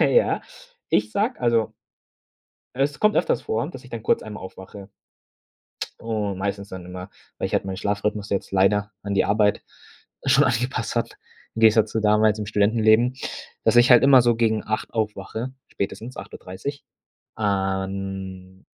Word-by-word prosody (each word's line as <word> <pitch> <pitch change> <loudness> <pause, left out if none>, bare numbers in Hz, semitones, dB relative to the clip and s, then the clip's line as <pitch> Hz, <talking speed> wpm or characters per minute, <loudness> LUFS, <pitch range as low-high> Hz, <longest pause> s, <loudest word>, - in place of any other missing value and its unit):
Ja. - - +3 0.5
Ich 105 0 +1
sage, 215 - -1
also 115 -2 +2 1.1
Es 145 +2 0
kommt 215 0 +3
öfters - - +2
vor, 115 +6 -2
dass 135 - -11
ich 125 - -14
dann 115 -2 -6
kurz - - +2
einmal 105 -3 -8
aufwache. 95 +1 -10 1.1
Und 105 -4 -2
meistens 100 +1 -3
dann 95 -2 -8
immer, 90 +1 -8 0.3
weil - - -1
ich - - -8
halt - - +1
meinen 95 -1 -4
Schlafrhythmus 105 +1 -2
jetzt 100 -1 -2
leider 100 +2 +2
an 100 -1 -3
die 100 - +3
Arbeit 105 0 +2 0.6
schon - - +5
angepasst 125 0 -1
hat, 115 - -1 0.4
im 110 - -4
Gegensatz 110 -1 +5
zu 110 - -1
damals 105 0 +3
im 105 - -4
Studentenleben 110 +3 +3 0.5
dass - - +3
ich 120 +2 +6
halt 120 -2 +8
immer 135 -2 +7
so 120 -1 +3
gegen 110 -2 +1
8 110 0 -3
aufwache, 110 +3 -3 0.2
spätestens 110 +5 -5
8:30, 140 +11 -7 0.5
ähm, 95 -2 -3
105 Hz, 155 wpm, -23 LUFS, 100-115 Hz, 1.1 s, halt